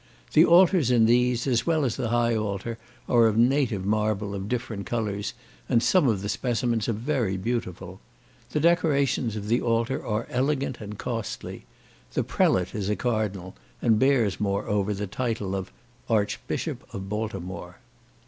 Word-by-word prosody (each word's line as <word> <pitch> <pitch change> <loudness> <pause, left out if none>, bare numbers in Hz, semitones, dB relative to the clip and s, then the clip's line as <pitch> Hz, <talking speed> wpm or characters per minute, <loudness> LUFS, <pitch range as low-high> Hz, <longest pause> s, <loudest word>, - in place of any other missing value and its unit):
The 160 - +7
altars 175 - +5
in 120 -3 +5
these, 120 +1 +3
as 125 0 +1
well 160 -3 +2
as 120 - -1
the 120 -4 -2
high 120 0 +2
altar, 110 +2 -3 0.3
are 115 -2 +5
of 110 -1 0
native 120 -5 +2
marble 105 -1 0
of 100 0 -5
different 115 -5 -3
colours, 105 -4 -2 0.3
and 115 - +3
some 180 -7 +4
of 105 -5 0
the - - -2
specimens 115 +1 -1
are - - +1
very 115 -4 -1
beautiful. 115 -3 -4 0.5
The - - -1
decorations 145 - +2
of 105 -1 -5
the 120 +3 +2
altar 115 +2 0
are 110 +1 -2
elegant 135 -1 -1
and 105 -1 -7
costly. 115 -3 -5 0.5
The - - +1
prelate 90 -1 +1
is 105 -2 -2
a 105 - +1
cardinal, 105 - -2 0.2
and 110 -2 +3
bears, 125 -7 +2
moreover, 100 0 0
the 105 +1 -3
title 105 -2 -3
of 95 -1 -5 0.4
"Archbishop 105 -3 -1
of 95 -1 -5
Baltimore." 95 -4 -5
115 Hz, 160 wpm, -26 LUFS, 100-125 Hz, 0.5 s, The